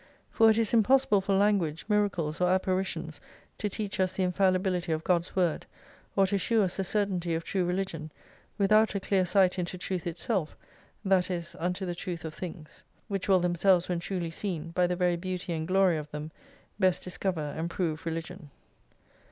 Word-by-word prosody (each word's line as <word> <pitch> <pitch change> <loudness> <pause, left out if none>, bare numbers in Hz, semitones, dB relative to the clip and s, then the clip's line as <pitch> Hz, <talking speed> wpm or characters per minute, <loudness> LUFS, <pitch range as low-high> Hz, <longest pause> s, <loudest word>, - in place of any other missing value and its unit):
For 225 -1 +5
it 220 - +4
is 230 -1 +1
impossible 230 -2 +4
for 195 0 0
lan 205 +1 +4
guage, 155 -2 -4
miracles, 190 -7 0
or 180 - +3
apparitions 185 -4 -1 0.4
to 210 - -1
teach 205 0 -4
us 185 -1 +2
the 190 - 0
infalli 185 +1 +3
bility 180 -4 -1
of^God's 170 +1 0
word, 175 -4 +1 0.5
or 195 - +5
to 195 +1 0
shew 220 +4 +2
us 185 -2 -2
the 195 - 0
certainty 185 -4 -1
of 165 - -3
true 190 +1 -1
religion, 175 -4 -3 0.5
without 215 +2 +4
a - - +1
clear 190 -1 +1
sight 185 0 +3
into 180 +1 -3
truth 180 -1 -4
itself, 170 0 -2 0.5
that 190 -2 +3
is 170 -2 -4
unto 180 +3 -2
the 175 - -2
truth 175 -2 -5
of 160 - -5
things. 165 -3 -8 0.3
Which 195 -1 -3
will 190 -2 +5
themselves 180 +1 +3
when 175 -1 0
truly 175 -1 -3
seen, 170 -3 -4
by 180 +1 +2
the 180 - -1
very 175 -1 +1
beauty 180 0 -4
and 160 -1 -3
glory 185 -2 +3
of 150 0 -6
them, 150 +1 -6 0.5
best 185 -2 +2
discover, 175 -5 -3
and 165 +1 -3
prove 165 -3 -2
religion. 165 0 -5
180 Hz, 185 wpm, -29 LUFS, 170-195 Hz, 0.5 s, For